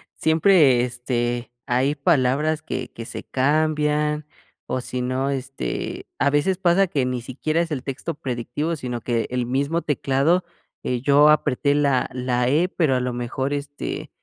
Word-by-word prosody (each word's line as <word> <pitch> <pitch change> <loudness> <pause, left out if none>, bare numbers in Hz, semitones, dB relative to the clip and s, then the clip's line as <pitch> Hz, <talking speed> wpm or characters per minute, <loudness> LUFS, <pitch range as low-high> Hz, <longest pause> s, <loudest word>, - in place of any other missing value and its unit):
siempre, 160 -6 +4
este, 120 -1 -2
hay 130 +4 +1
palabras 150 +1 +2
que 130 -5 -4
que 115 - -7
se - - -7
cambian 150 +1 +1 0.4
o 130 - -2
si 125 0 -4
no, 130 +2 -1
este, 135 0 -4
a 140 - +3
veces 145 +6 +1
pasa 190 +1 +3
que 140 -6 0
ni 125 -1 -2
siquiera 140 +6 -2
es 170 - -2
el 135 -4 -3
texto 140 +5 -4
predictivo 135 +5 -3
sino 125 -4 -4
que 115 0 -1
el 125 -1 -1
mismo 140 +7 0
teclado, 145 +5 +1 0.4
eh, 125 -1 -1
yo 145 +2 +5
apreté 145 -1 +2
la 140 -3 +2
la 125 -1 0
e 155 +7 +2
pero 160 -8 +1
a 125 - +1
lo 125 0 -1
mejor, 125 +3 -3
este, 145 0 -5
140 Hz, 160 wpm, -23 LUFS, 125-150 Hz, 0.4 s, yo